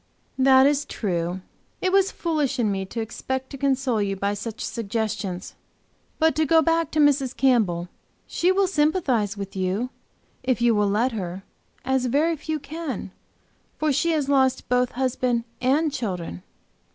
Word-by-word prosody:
"That 265 Hz, 0 st, +6 dB
is 290 Hz, 0 st, +3 dB
true. 180 Hz, -2 st, -2 dB, 0.4 s
It 370 Hz, -, 0 dB
was 390 Hz, 0 st, +3 dB
foolish 300 Hz, -5 st, -1 dB
in 225 Hz, -4 st, +1 dB
me 195 Hz, -1 st, -2 dB
to 225 Hz, +4 st, -4 dB
expect 260 Hz, +4 st, -4 dB
to -, -, -6 dB
console 265 Hz, -4 st, +1 dB
you 195 Hz, -1 st, -1 dB
by 200 Hz, +1 st, -1 dB
such 215 Hz, +2 st, -6 dB
suggestions. 205 Hz, -4 st, -3 dB, 0.6 s
But 320 Hz, -3 st, +3 dB
to 315 Hz, -, +3 dB
go 320 Hz, +2 st, +5 dB
back 330 Hz, 0 st, +1 dB
to 310 Hz, -, +1 dB
Mrs. 280 Hz, -3 st, +3 dB
Campbell. 210 Hz, -10 st, +2 dB, 0.4 s
She 360 Hz, +2 st, +1 dB
will 390 Hz, +1 st, +3 dB
sympathize 295 Hz, -, +1 dB
with 200 Hz, -1 st, -6 dB
you, 195 Hz, +7 st, -1 dB, 0.5 s
if 255 Hz, -2 st, 0 dB
you 240 Hz, -1 st, +4 dB
will 210 Hz, -1 st, +2 dB
let 230 Hz, +6 st, +1 dB
her, 190 Hz, -3 st, -5 dB, 0.4 s
as 265 Hz, -1 st, +1 dB
very 305 Hz, +7 st, +2 dB
few 315 Hz, +1 st, -3 dB
can, 285 Hz, -, -5 dB, 0.7 s
for 305 Hz, -2 st, +1 dB
she 335 Hz, -, +1 dB
has 295 Hz, -3 st, 0 dB
lost 265 Hz, -2 st, +2 dB
both 250 Hz, 0 st, +2 dB
husband 250 Hz, -2 st, 0 dB, 0.2 s
and 290 Hz, +5 st, +2 dB
children." 180 Hz, -, -4 dB
255 Hz, 160 wpm, -24 LUFS, 205-295 Hz, 0.7 s, That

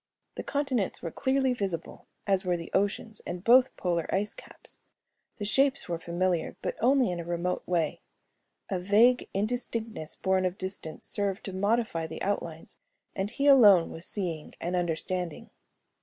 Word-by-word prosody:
The -, -, -5 dB
continents 270 Hz, -8 st, -1 dB
were 165 Hz, -, -3 dB
clearly 265 Hz, -, +1 dB
visible, 190 Hz, -8 st, -4 dB, 0.2 s
as 195 Hz, -1 st, +2 dB
were 180 Hz, -2 st, +1 dB
the 165 Hz, -, -8 dB
oceans 205 Hz, +2 st, -1 dB
and 175 Hz, 0 st, -5 dB
both 255 Hz, +3 st, +5 dB
polar 170 Hz, -2 st, -1 dB
ice 205 Hz, +2 st, 0 dB
caps. -, -, -10 dB, 0.6 s
The 205 Hz, -, -4 dB
shapes 270 Hz, +6 st, +3 dB
were 170 Hz, -2 st, -2 dB
familiar 175 Hz, 0 st, -1 dB
but -, -, -1 dB
in -, -, -11 dB
only 260 Hz, -8 st, +4 dB
a 170 Hz, -1 st, -4 dB
remote 175 Hz, +2 st, -2 dB
way. 170 Hz, -4 st, 0 dB, 0.7 s
A 190 Hz, -, 0 dB
vague 220 Hz, +7 st, +4 dB
indistinctness 220 Hz, -4 st, -2 dB
borne 190 Hz, -1 st, +1 dB
of 185 Hz, +1 st, -1 dB
distance 185 Hz, -4 st, -5 dB
served 200 Hz, 0 st, -2 dB
to 195 Hz, -, -6 dB
modify 200 Hz, -4 st, 0 dB
the 160 Hz, -, -6 dB
outlines 170 Hz, -5 st, -3 dB, 0.4 s
and 195 Hz, +1 st, -1 dB
he 275 Hz, -, -2 dB
alone 210 Hz, -11 st, +7 dB
was 165 Hz, -, -4 dB
seeing 170 Hz, -7 st, -3 dB
and 175 Hz, +2 st, -2 dB
understanding. 175 Hz, 0 st, -2 dB
190 Hz, 155 wpm, -28 LUFS, 175-225 Hz, 0.7 s, alone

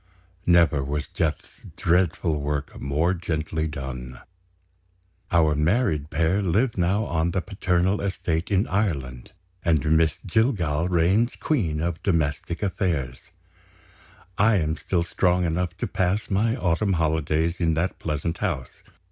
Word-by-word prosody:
Never 85 Hz, -5 st, +4 dB
was 75 Hz, +2 st, -3 dB
Death's 80 Hz, -2 st, -3 dB, 0.2 s
dreadful 85 Hz, -3 st, +1 dB
work 75 Hz, 0 st, -3 dB
more 75 Hz, +7 st, +1 dB
gently 80 Hz, -2 st, -2 dB
done. 65 Hz, -4 st, -6 dB, 1.1 s
Our 80 Hz, -3 st, +4 dB
married 75 Hz, -, +1 dB
pair 85 Hz, +5 st, +1 dB
live 105 Hz, +7 st, +1 dB
now 95 Hz, +4 st, +1 dB
on 85 Hz, -1 st, 0 dB
the 95 Hz, +1 st, -1 dB
paternal 95 Hz, -1 st, 0 dB
estate 90 Hz, -4 st, -2 dB
in 100 Hz, +1 st, +2 dB
Ireland; 70 Hz, -, -2 dB, 0.3 s
and 80 Hz, -2 st, +2 dB
Miss 80 Hz, 0 st, +2 dB
Jillgall 90 Hz, -, +1 dB
reigns 95 Hz, +8 st, +2 dB
queen 85 Hz, -, -1 dB
of 85 Hz, 0 st, -2 dB
domestic 85 Hz, 0 st, -1 dB
affairs. 80 Hz, -11 st, -1 dB, 1.2 s
I 110 Hz, +2 st, +5 dB
am 80 Hz, -4 st, 0 dB
still 85 Hz, 0 st, -1 dB
strong 90 Hz, +1 st, +1 dB
enough 90 Hz, +1 st, -2 dB
to -, -, -2 dB
pass 95 Hz, +2 st, -1 dB
my 110 Hz, +4 st, +2 dB
autumn 95 Hz, 0 st, +1 dB
holidays 80 Hz, 0 st, 0 dB
in 80 Hz, -2 st, +1 dB
that 85 Hz, +4 st, -1 dB
pleasant 80 Hz, +2 st, -3 dB
house. 80 Hz, -12 st, -3 dB
85 Hz, 130 wpm, -24 LUFS, 75-95 Hz, 1.2 s, I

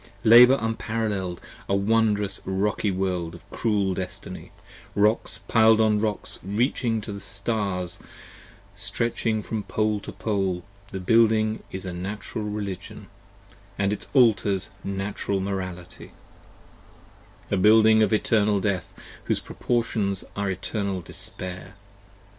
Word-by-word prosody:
Labour 125 Hz, +4 st, +8 dB
unparall[el]ed! 110 Hz, -5 st, -2 dB, 0.3 s
a 100 Hz, -, +3 dB
wondrous 105 Hz, -1 st, +1 dB
rocky 100 Hz, +2 st, 0 dB
World 90 Hz, -3 st, -2 dB
of 85 Hz, -, -15 dB
cruel 100 Hz, -4 st, +1 dB
destiny, 90 Hz, 0 st, -7 dB, 0.4 s
Rocks 105 Hz, +3 st, +1 dB
piled 110 Hz, -1 st, +5 dB
on 110 Hz, -1 st, +3 dB
rocks 105 Hz, -1 st, -2 dB
reaching 115 Hz, +3 st, 0 dB
the 100 Hz, -2 st, -7 dB
stars, 100 Hz, -4 st, -2 dB, 0.8 s
stretching 115 Hz, -2 st, -1 dB
from 110 Hz, 0 st, -3 dB
pole 105 Hz, 0 st, 0 dB
to -, -, -8 dB
pole. 95 Hz, -5 st, -1 dB, 0.2 s
The 95 Hz, -1 st, -6 dB
Building 110 Hz, +2 st, +3 dB
is 95 Hz, +1 st, -6 dB
Natural 100 Hz, +4 st, -5 dB
Religion 105 Hz, -3 st, -5 dB, 0.3 s
& 100 Hz, 0 st, -27 dB
its 100 Hz, +1 st, -1 dB
Altars 105 Hz, -5 st, +3 dB
Natural 100 Hz, 0 st, -2 dB
Morality: 95 Hz, -2 st, -5 dB, 1.4 s
A 100 Hz, -, +2 dB
building 110 Hz, +2 st, +6 dB
of 110 Hz, -, +3 dB
eternal 105 Hz, -1 st, +2 dB
death, 95 Hz, -2 st, -2 dB, 0.3 s
whose -, -, 0 dB
proportions 110 Hz, -5 st, -1 dB
are 100 Hz, -1 st, -1 dB
eternal 100 Hz, 0 st, -2 dB
despair. 90 Hz, +3 st, -7 dB
100 Hz, 110 wpm, -25 LUFS, 95-110 Hz, 1.4 s, Labour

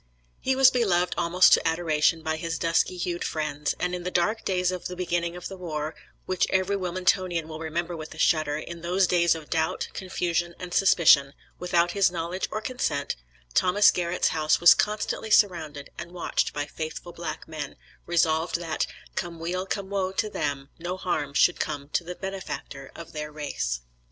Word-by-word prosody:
He 265 Hz, -, +1 dB
was 265 Hz, 0 st, +7 dB
beloved 180 Hz, -8 st, +2 dB
almost 175 Hz, +1 st, +5 dB
to -, -, +4 dB
adoration 160 Hz, -1 st, +2 dB
by 160 Hz, 0 st, -1 dB
his 165 Hz, 0 st, -3 dB
dusky 170 Hz, +2 st, +1 dB
hued 175 Hz, 0 st, -2 dB
friends, 155 Hz, -1 st, -2 dB
and 180 Hz, 0 st, -1 dB
in 180 Hz, -, -3 dB
the 180 Hz, -, -3 dB
dark 195 Hz, +6 st, +1 dB
days 180 Hz, -1 st, +1 dB
of 180 Hz, -1 st, -5 dB
the 180 Hz, -, -4 dB
beginning 175 Hz, -1 st, -1 dB
of 180 Hz, -, -6 dB
the 195 Hz, -, -8 dB
war, 155 Hz, -3 st, -4 dB, 0.3 s
which 185 Hz, -1 st, +1 dB
every 190 Hz, +1 st, +1 dB
Wilmingtonian 180 Hz, -2 st, 0 dB
will 155 Hz, -1 st, -7 dB
remember 170 Hz, +2 st, -3 dB
with 155 Hz, -1 st, -8 dB
a -, -, -13 dB
shudder, 155 Hz, -2 st, +2 dB
in 170 Hz, +2 st, -7 dB
those 180 Hz, +3 st, +2 dB
days 170 Hz, -1 st, +3 dB
of 160 Hz, -2 st, -10 dB
doubt, 160 Hz, -1 st, 0 dB
confusion, 175 Hz, -2 st, -2 dB
and 180 Hz, -1 st, -7 dB
suspicion, 150 Hz, -7 st, +5 dB, 0.2 s
without 175 Hz, -1 st, +2 dB
his 200 Hz, 0 st, +3 dB
knowledge 175 Hz, +2 st, -3 dB
or 215 Hz, -, -3 dB
consent, 150 Hz, -, -2 dB, 0.4 s
Thomas 200 Hz, -, +5 dB
Garrett's 175 Hz, 0 st, 0 dB
house 155 Hz, -1 st, +2 dB
was 170 Hz, -, +9 dB
constantly 215 Hz, +1 st, -1 dB
surrounded 160 Hz, -9 st, +2 dB
and 170 Hz, -, -7 dB
watched 180 Hz, -1 st, -1 dB
by 145 Hz, 0 st, -3 dB
faithful 160 Hz, +3 st, -6 dB
black 170 Hz, 0 st, -6 dB
men, 155 Hz, -2 st, -6 dB, 0.3 s
resolved 165 Hz, -1 st, +2 dB
that, 165 Hz, -2 st, -1 dB, 0.3 s
come 175 Hz, -2 st, -4 dB
weal 180 Hz, +3 st, -3 dB
come 195 Hz, 0 st, -3 dB
woe 190 Hz, -2 st, 0 dB
to 215 Hz, +2 st, -1 dB
them, 140 Hz, -5 st, -3 dB
no 175 Hz, +2 st, -4 dB
harm 150 Hz, -6 st, -2 dB
should -, -, +4 dB
come 145 Hz, -2 st, -3 dB
to 170 Hz, -, 0 dB
the 180 Hz, +1 st, -6 dB
benefactor 190 Hz, -8 st, -6 dB
of 170 Hz, -, -10 dB
their 150 Hz, 0 st, -5 dB
race. 140 Hz, -, -3 dB
170 Hz, 180 wpm, -26 LUFS, 160-185 Hz, 0.4 s, was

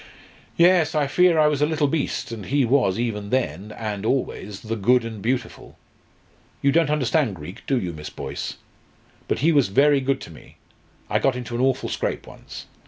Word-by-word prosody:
"Yes, 170 Hz, -3 st, +4 dB
I 150 Hz, -1 st, +2 dB
fear 175 Hz, +4 st, +3 dB
I 155 Hz, -, +5 dB
was 150 Hz, -2 st, +1 dB
a 150 Hz, -, +4 dB
little 155 Hz, -2 st, +1 dB
beast. 140 Hz, -4 st, -2 dB
And 110 Hz, -5 st, -7 dB
he 140 Hz, -1 st, +2 dB
was, 120 Hz, -6 st, +2 dB
even 105 Hz, -4 st, -3 dB
then, 105 Hz, -, -2 dB
and 105 Hz, -3 st, -4 dB
always, 105 Hz, -5 st, -2 dB
'the 115 Hz, 0 st, -4 dB
good 120 Hz, +4 st, +3 dB
and 110 Hz, -3 st, -7 dB
beautiful.' 120 Hz, +1 st, -3 dB, 0.9 s
You 140 Hz, -, +4 dB
don't 165 Hz, 0 st, +3 dB
understand 140 Hz, -5 st, +1 dB
Greek, 85 Hz, +3 st, -10 dB
do 135 Hz, -2 st, +2 dB
you, 90 Hz, -5 st, -4 dB
Miss 75 Hz, -1 st, -8 dB
Boyce? -, -, -6 dB, 0.7 s
But -, -, -1 dB
he 165 Hz, -, +5 dB
was 145 Hz, -7 st, +4 dB
very 140 Hz, +7 st, +4 dB
good 135 Hz, 0 st, 0 dB
to -, -, -9 dB
me. 80 Hz, -, -16 dB, 0.5 s
I -, -, +1 dB
got 135 Hz, -2 st, +1 dB
into 125 Hz, -1 st, -6 dB
an 120 Hz, -, -1 dB
awful 130 Hz, 0 st, +1 dB
scrape -, -, -3 dB
once. -, -, -11 dB
125 Hz, 190 wpm, -23 LUFS, 105-145 Hz, 0.9 s, I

